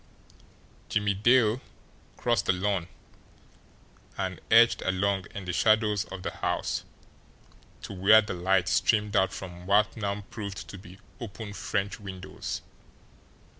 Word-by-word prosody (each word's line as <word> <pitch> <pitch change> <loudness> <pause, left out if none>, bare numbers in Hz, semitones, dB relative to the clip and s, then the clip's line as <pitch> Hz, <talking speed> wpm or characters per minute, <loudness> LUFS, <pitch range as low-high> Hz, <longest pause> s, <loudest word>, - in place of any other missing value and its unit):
Jimmie 105 -1 +1
Dale 115 +3 +3 0.6
crossed - - 0
the - - +4
lawn, 95 -2 -1 1.3
and - - -3
edged 115 +1 +6
along 95 0 0
in 100 - -6
the 90 - -3
shadows 110 0 +3
of 95 -1 -8
the - - -2
house - - -2 1.0
to - - -6
where 105 +4 +6
the 105 - -4
light 90 0 +1
streamed 105 +1 +2
out 95 -1 +3
from 90 -2 -8
what 100 0 +3
now 100 -2 -2
proved 100 -3 -6
to 100 - -9
be 95 -1 -13 0.2
open 110 -2 -7
French 100 0 -2
windows. 95 -2 -6
100 Hz, 130 wpm, -28 LUFS, 95-105 Hz, 1.3 s, edged